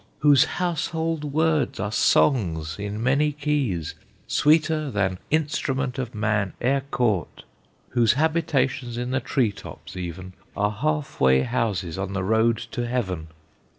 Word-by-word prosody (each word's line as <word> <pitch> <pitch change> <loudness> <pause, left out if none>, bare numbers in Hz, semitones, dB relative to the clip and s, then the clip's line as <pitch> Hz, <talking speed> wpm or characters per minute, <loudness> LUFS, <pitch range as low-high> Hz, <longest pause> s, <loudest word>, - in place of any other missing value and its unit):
Whose 145 0 +6
household 165 -2 -2
words 155 +1 +1
are 105 +1 -2
songs 85 - +2
in 105 +2 -4
many 140 +4 +2
keys, 140 - -1 0.3
Sweeter 155 0 +2
than 95 -5 -1
instrument 140 -4 -1
of 125 -3 -4
man 105 -3 0
e'er 135 +3 +1
caught! 110 -10 -1 0.5
Whose 120 -3 +3
habitations 135 -5 0
in 125 +1 -3
the 130 - +1
tree 125 -5 +1
tops 100 - -11
even 90 +1 -6 0.2
Are 105 0 +1
half 75 -8 -2
way 65 0 +5
houses 105 -8 -2
on 95 0 -3
the 100 -1 -1
road 110 +3 +2
to 120 0 -2
heaven! 95 -10 -2
120 Hz, 135 wpm, -24 LUFS, 100-145 Hz, 0.5 s, Whose